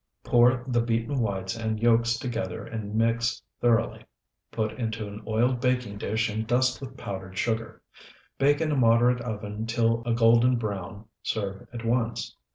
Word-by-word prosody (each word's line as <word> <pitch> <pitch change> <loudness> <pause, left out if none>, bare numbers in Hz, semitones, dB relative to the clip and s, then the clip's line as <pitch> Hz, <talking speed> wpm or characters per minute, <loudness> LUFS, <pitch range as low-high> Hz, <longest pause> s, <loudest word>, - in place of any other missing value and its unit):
Pour 120 +1 +4
the 120 -2 +2
beaten 115 +4 -1
whites 95 -3 -2
and 110 -1 -2
yolks 115 0 +3
together 115 -8 -4
and 110 -2 -5
mix 115 +1 +1 0.2
thoroughly. 115 -2 +1 0.5
Put 110 -1 -1
into 110 -3 -4
an 100 +1 -8
oiled 120 +3 +1
baking 125 -5 0
dish, 110 +2 0
and 110 +1 -3
dust 125 +2 +2
with 135 - -8
powdered 95 -1 -6
sugar. 115 -1 -2 0.6
Bake 145 +2 +3
in 155 -1 +1
a - - +1
moderate 120 0 +4
oven 105 -1 -5
till 115 0 +1
a 120 - +2
golden 115 +2 +5
brown. 105 -2 -4 0.2
Serve 100 -3 -3
at 120 -1 -7
once. 115 - -1
115 Hz, 160 wpm, -27 LUFS, 110-120 Hz, 0.6 s, golden